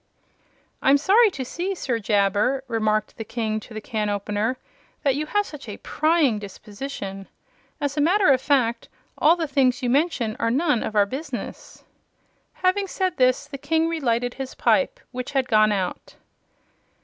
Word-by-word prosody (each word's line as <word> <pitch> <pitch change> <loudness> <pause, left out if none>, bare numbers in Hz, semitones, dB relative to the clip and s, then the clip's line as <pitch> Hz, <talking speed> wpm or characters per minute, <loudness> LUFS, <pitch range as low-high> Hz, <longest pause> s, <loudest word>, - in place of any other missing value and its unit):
"I'm 275 +1 +5
sorry 420 +9 +5
to 270 -9 -5
see, 365 +8 -3
Sir 245 -9 -2
Jabber," 205 +5 +1
remarked 215 -2 0
the 225 - -4
King 220 -1 -2
to 220 - -13
the - - -3
can 215 -1 -2
opener, 210 +4 -1 0.5
"that 275 - +3
you 300 +3 -3
have 410 +4 +1
such 280 - -10
a 205 - -6
prying 310 -8 +1
disposition. 200 -1 -7 0.5
As 285 -1 -2
a - - +3
matter 370 +4 +4
of 260 -1 +3
fact, 250 -5 +1 0.3
all 320 +3 +5
the 330 -2 -2
things 265 -2 +1
you 245 - +1
mention 270 -6 +1
are 230 - +1
none 280 0 +1
of 215 - -4
our 205 -1 +5
business." 265 +3 -7 0.8
Having 390 +2 +2
said 370 -1 -2
this 255 +2 +3
the 280 -1 -8
King 320 +3 +1
relighted 245 -7 0
his 265 -1 -7
pipe, - - +2
which 255 +1 -5
had 265 -2 +1
gone 215 -2 +4
out. 190 -3 -3
260 Hz, 165 wpm, -23 LUFS, 215-305 Hz, 0.8 s, I'm